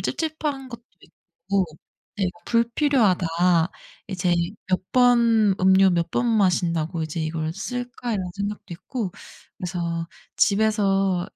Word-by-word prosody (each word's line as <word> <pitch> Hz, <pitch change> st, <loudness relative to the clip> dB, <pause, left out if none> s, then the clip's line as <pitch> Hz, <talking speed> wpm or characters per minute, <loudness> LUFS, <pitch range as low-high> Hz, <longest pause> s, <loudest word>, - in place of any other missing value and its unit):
찝찝한 300 Hz, -4 st, -3 dB
것도 235 Hz, -1 st, -10 dB, 0.2 s
있고 185 Hz, +3 st, -4 dB, 0.5 s
네 200 Hz, -, 0 dB
뭐 220 Hz, -, -23 dB
'불필요하다. 230 Hz, -, +2 dB, 0.8 s
이제 180 Hz, -2 st, 0 dB, 0.3 s
몇 185 Hz, 0 st, +1 dB
번 235 Hz, -4 st, +4 dB
음료 190 Hz, +1 st, +6 dB
몇 170 Hz, -1 st, 0 dB
번 240 Hz, -, 0 dB
마신다고 170 Hz, -6 st, +1 dB
이제 155 Hz, +1 st, -4 dB
이걸 155 Hz, 0 st, -2 dB
쓸까?' 245 Hz, +3 st, -4 dB
이런 190 Hz, -3 st, -2 dB
생각도 200 Hz, -1 st, -5 dB
있고 200 Hz, +2 st, -5 dB, 0.5 s
그래서 170 Hz, -2 st, -3 dB, 0.3 s
집에서 195 Hz, -3 st, +2 dB
195 Hz, 240 characters per minute, -24 LUFS, 175-235 Hz, 0.8 s, 음료